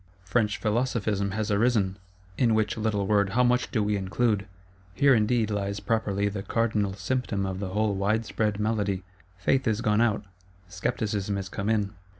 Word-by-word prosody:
French 105 Hz, 0 st, +1 dB
Philosophism 105 Hz, -1 st, 0 dB
has 105 Hz, +2 st, -2 dB
arisen; 105 Hz, -3 st, +2 dB, 0.4 s
in 115 Hz, +2 st, +3 dB
which 110 Hz, -1 st, +1 dB
little 105 Hz, -2 st, 0 dB
word 100 Hz, -1 st, +2 dB
how 125 Hz, +2 st, +4 dB
much 125 Hz, +1 st, +2 dB
do 110 Hz, -4 st, 0 dB
we 105 Hz, 0 st, +1 dB
include! 100 Hz, +1 st, 0 dB, 0.5 s
Here, 140 Hz, -1 st, +5 dB
indeed, 110 Hz, -1 st, +2 dB
lies 100 Hz, 0 st, -2 dB
properly 100 Hz, -2 st, 0 dB
the 100 Hz, -1 st, -3 dB
cardinal 105 Hz, -2 st, 0 dB
symptom 100 Hz, 0 st, -1 dB
of 95 Hz, -1 st, -3 dB
the 100 Hz, -2 st, -3 dB
whole 105 Hz, +2 st, +1 dB
wide 105 Hz, +4 st, 0 dB
spread 105 Hz, -1 st, -1 dB
malady. 105 Hz, -3 st, 0 dB, 0.3 s
Faith 130 Hz, +8 st, +1 dB
is 110 Hz, -1 st, +1 dB
gone 105 Hz, -1 st, +2 dB
out; 110 Hz, -3 st, +1 dB, 0.4 s
Scepticism 100 Hz, +2 st, -2 dB
is 95 Hz, -2 st, -4 dB
come 100 Hz, +3 st, -3 dB
in. 105 Hz, -2 st, +1 dB
105 Hz, 165 wpm, -27 LUFS, 100-115 Hz, 0.5 s, Here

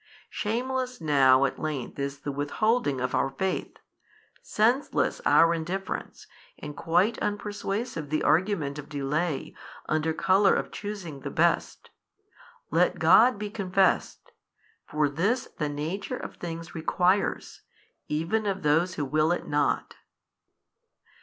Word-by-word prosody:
Shameless 255 Hz, +3 st, -2 dB
now 135 Hz, -4 st, +4 dB
at 135 Hz, -, -3 dB
length 150 Hz, -4 st, -4 dB
is 140 Hz, 0 st, -4 dB
the 145 Hz, -, -3 dB
withholding 145 Hz, -, 0 dB
of 125 Hz, 0 st, -2 dB
our 135 Hz, -, +1 dB
faith, 185 Hz, +8 st, -3 dB, 0.6 s
senseless 240 Hz, +6 st, +1 dB
our 165 Hz, 0 st, +6 dB
indifference, 180 Hz, +4 st, -4 dB, 0.3 s
and 150 Hz, -1 st, -8 dB
quite 180 Hz, +7 st, +1 dB
unpersuasive 205 Hz, -, -3 dB
the 155 Hz, -, 0 dB
argument 160 Hz, -5 st, +1 dB
of 145 Hz, 0 st, -9 dB
delay 150 Hz, +2 st, -2 dB, 0.3 s
under 155 Hz, +1 st, 0 dB
colour 190 Hz, +4 st, +3 dB
of -, -, -2 dB
choosing 195 Hz, -8 st, -6 dB
the -, -, -5 dB
best. -, -, 0 dB, 0.8 s
Let 170 Hz, +3 st, +2 dB
God 205 Hz, +9 st, +6 dB
be 205 Hz, 0 st, -5 dB
confessed: 190 Hz, -2 st, 0 dB, 0.6 s
for 150 Hz, 0 st, +1 dB
this 195 Hz, -, -1 dB
the 150 Hz, -2 st, 0 dB
nature 155 Hz, +7 st, -4 dB
of -, -, -8 dB
things 165 Hz, -1 st, -7 dB
requires, 180 Hz, +4 st, 0 dB, 0.5 s
even 170 Hz, +8 st, -1 dB
of 195 Hz, -2 st, -2 dB
those 165 Hz, +5 st, +2 dB
who 145 Hz, -, -2 dB
will 155 Hz, +4 st, +2 dB
it 175 Hz, -, -2 dB
not. 145 Hz, 0 st, 0 dB
165 Hz, 125 wpm, -27 LUFS, 150-200 Hz, 0.8 s, our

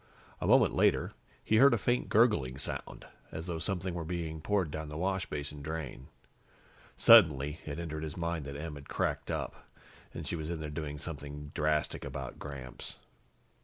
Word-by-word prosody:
A -, -, -2 dB
moment -, -, +6 dB
later, -, -, +3 dB, 0.3 s
he 110 Hz, -, +3 dB
heard 135 Hz, +1 st, +7 dB
a -, -, +1 dB
faint 120 Hz, +3 st, 0 dB
gurgling 105 Hz, -, +3 dB
sound, 70 Hz, -, -3 dB, 0.3 s
as 80 Hz, -, -5 dB
though 85 Hz, -3 st, -3 dB
something 95 Hz, +1 st, -2 dB
were 85 Hz, -1 st, -3 dB
being 80 Hz, -2 st, -4 dB
poured 95 Hz, -4 st, +1 dB
down 80 Hz, 0 st, -5 dB
the 75 Hz, -, -6 dB
washbasin 75 Hz, -6 st, -2 dB
drain. 70 Hz, -4 st, -5 dB, 0.9 s
Suddenly, 75 Hz, -9 st, +7 dB
it 70 Hz, -, -4 dB
entered 80 Hz, -2 st, -4 dB
his 80 Hz, +1 st, -5 dB
mind 85 Hz, -3 st, -2 dB
that 70 Hz, 0 st, -6 dB
Em 80 Hz, +1 st, -5 dB
had 70 Hz, -1 st, -10 dB
cracked -, -, -1 dB
up, -, -, -4 dB, 0.4 s
that -, -, -6 dB
she -, -, -2 dB
was 80 Hz, -1 st, -4 dB
in 85 Hz, -, -2 dB
there 75 Hz, -1 st, -5 dB
doing 75 Hz, -1 st, -4 dB
something 75 Hz, -1 st, -7 dB
drastic 75 Hz, 0 st, 0 dB
about 65 Hz, -2 st, -6 dB
Gramps. 65 Hz, -4 st, -8 dB
80 Hz, 170 wpm, -32 LUFS, 75-85 Hz, 0.9 s, heard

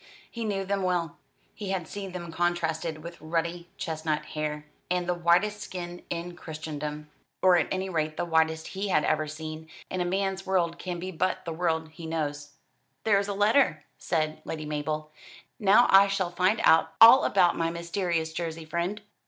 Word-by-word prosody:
He 235 Hz, -1 st, -4 dB
knew 195 Hz, -2 st, -1 dB
them 200 Hz, 0 st, -1 dB
well. 175 Hz, -3 st, -1 dB, 0.3 s
He 205 Hz, -2 st, -6 dB
had 190 Hz, -3 st, -2 dB
seen 195 Hz, -2 st, -6 dB
them 175 Hz, -2 st, -6 dB
contrasted 165 Hz, -2 st, -1 dB
with 170 Hz, -1 st, -9 dB
ruddy 170 Hz, +2 st, -2 dB
chestnut 155 Hz, -1 st, -2 dB
hair, 150 Hz, 0 st, -4 dB, 0.2 s
and 180 Hz, 0 st, 0 dB
the 180 Hz, -, +2 dB
whitest 175 Hz, +5 st, +2 dB
skin 175 Hz, -1 st, -6 dB
in 175 Hz, +1 st, -4 dB
Christendom 150 Hz, -2 st, -6 dB, 0.3 s
or 185 Hz, -1 st, +7 dB
at 175 Hz, -, +2 dB
any 190 Hz, 0 st, -2 dB
rate 155 Hz, -3 st, -2 dB
the -, -, -1 dB
whitest 160 Hz, -1 st, +1 dB
he 195 Hz, +1 st, -3 dB
had 150 Hz, -6 st, +2 dB
ever 155 Hz, 0 st, +1 dB
seen, 155 Hz, +1 st, -7 dB, 0.2 s
and 185 Hz, -, -1 dB
a -, -, 0 dB
man's 195 Hz, +1 st, -1 dB
world 175 Hz, -3 st, 0 dB
can 180 Hz, -1 st, -4 dB
be 185 Hz, +2 st, -5 dB
but 185 Hz, +2 st, -1 dB
the 165 Hz, -, -3 dB
world 160 Hz, -1 st, -1 dB
he 160 Hz, +1 st, -9 dB
knows. 145 Hz, -2 st, -3 dB, 0.5 s
"There 205 Hz, -3 st, +4 dB
is 200 Hz, -, -2 dB
a 200 Hz, -, -3 dB
letter," 205 Hz, -, +3 dB
said 155 Hz, -2 st, -1 dB
Lady 155 Hz, -1 st, -5 dB
Mabel. 155 Hz, +1 st, -3 dB, 0.5 s
"Now 210 Hz, +4 st, +6 dB
I 195 Hz, +1 st, +8 dB
shall 195 Hz, -3 st, -1 dB
find 185 Hz, +5 st, +2 dB
out 160 Hz, 0 st, +5 dB
all 235 Hz, +4 st, +10 dB
about 180 Hz, -3 st, +3 dB
my 165 Hz, 0 st, 0 dB
mysterious 170 Hz, -1 st, -2 dB
Jersey 165 Hz, -1 st, -4 dB
friend." 175 Hz, +6 st, -3 dB
170 Hz, 180 wpm, -27 LUFS, 160-190 Hz, 0.5 s, all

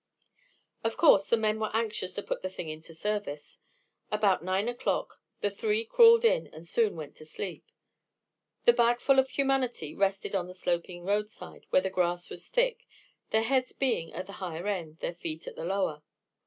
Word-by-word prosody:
Of 225 Hz, 0 st, -1 dB
course, 200 Hz, -, +6 dB
the 235 Hz, -, +4 dB
men 215 Hz, 0 st, +1 dB
were 215 Hz, -1 st, -1 dB
anxious 215 Hz, -5 st, -2 dB
to 205 Hz, -, -3 dB
put -, -, -3 dB
the 185 Hz, -, -3 dB
thing 175 Hz, -3 st, -6 dB
into 155 Hz, +1 st, -8 dB
service. 185 Hz, -4 st, -4 dB, 0.5 s
About 205 Hz, -5 st, +2 dB
nine 190 Hz, +4 st, 0 dB
o'clock, 245 Hz, 0 st, -2 dB, 0.2 s
the 205 Hz, -, +1 dB
three 215 Hz, +2 st, 0 dB
crawled 465 Hz, -, +7 dB
in -, -, +3 dB
and 160 Hz, +2 st, -12 dB
soon 220 Hz, +1 st, +1 dB
went 155 Hz, -3 st, -8 dB
to -, -, -11 dB
sleep. 180 Hz, +3 st, -6 dB, 1.0 s
The 480 Hz, -, +8 dB
bagful 240 Hz, -, +4 dB
of 265 Hz, 0 st, +2 dB
humanity 260 Hz, -, 0 dB
rested 195 Hz, 0 st, 0 dB
on 185 Hz, -3 st, 0 dB
the 180 Hz, -, -10 dB
sloping 175 Hz, -1 st, -2 dB
roadside 210 Hz, +2 st, -3 dB
where 185 Hz, -, +4 dB
the 190 Hz, -, -2 dB
grass 175 Hz, -1 st, -1 dB
was -, -, -9 dB
thick, -, -, 0 dB, 0.4 s
their 220 Hz, 0 st, +2 dB
heads 255 Hz, +2 st, +1 dB
being 245 Hz, -11 st, 0 dB
at 185 Hz, +2 st, -5 dB
the 200 Hz, -, -10 dB
higher 175 Hz, -1 st, -4 dB
end, 170 Hz, -6 st, -3 dB
their -, -, -2 dB
feet 165 Hz, -2 st, -6 dB
at -, -, -8 dB
the 160 Hz, -, -5 dB
lower. 185 Hz, -5 st, -1 dB
200 Hz, 180 wpm, -29 LUFS, 175-235 Hz, 1.0 s, The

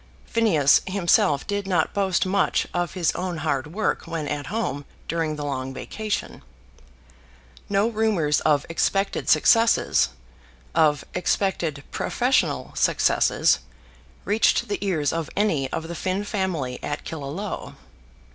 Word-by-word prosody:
Phineas 170 Hz, -12 st, +4 dB
himself 175 Hz, -7 st, +2 dB
did 205 Hz, -1 st, -2 dB
not 175 Hz, -4 st, +1 dB
boast 190 Hz, -3 st, +1 dB
much 195 Hz, +1 st, +1 dB
of 175 Hz, -2 st, -2 dB
his 175 Hz, -4 st, +2 dB
own 180 Hz, -2 st, -3 dB
hard 145 Hz, -3 st, -1 dB
work 200 Hz, +8 st, -2 dB
when 160 Hz, -3 st, -3 dB
at 145 Hz, -2 st, -3 dB
home 205 Hz, -11 st, -2 dB, 0.2 s
during 160 Hz, -1 st, -1 dB
the 150 Hz, -1 st, -5 dB
long 135 Hz, -1 st, -4 dB
vacation. 205 Hz, -, -4 dB, 1.3 s
No 200 Hz, +2 st, +2 dB
rumours 210 Hz, -10 st, +1 dB
of 145 Hz, -2 st, +2 dB
expected 195 Hz, +4 st, 0 dB
successes, 230 Hz, 0 st, +4 dB, 0.6 s
of 155 Hz, -3 st, +3 dB
expected 175 Hz, -5 st, -1 dB
professional -, -, 0 dB
successes, -, -, +3 dB, 0.7 s
reached 220 Hz, +3 st, +2 dB
the 205 Hz, -, -2 dB
ears 160 Hz, -8 st, 0 dB
of 165 Hz, -1 st, -3 dB
any 160 Hz, -11 st, +1 dB
of 160 Hz, 0 st, -3 dB
the 170 Hz, -, -5 dB
Finn 185 Hz, +3 st, -2 dB
family 180 Hz, -, -2 dB
at 145 Hz, -, -3 dB
Killaloe. 160 Hz, +6 st, -5 dB
170 Hz, 125 wpm, -24 LUFS, 150-200 Hz, 1.3 s, Phineas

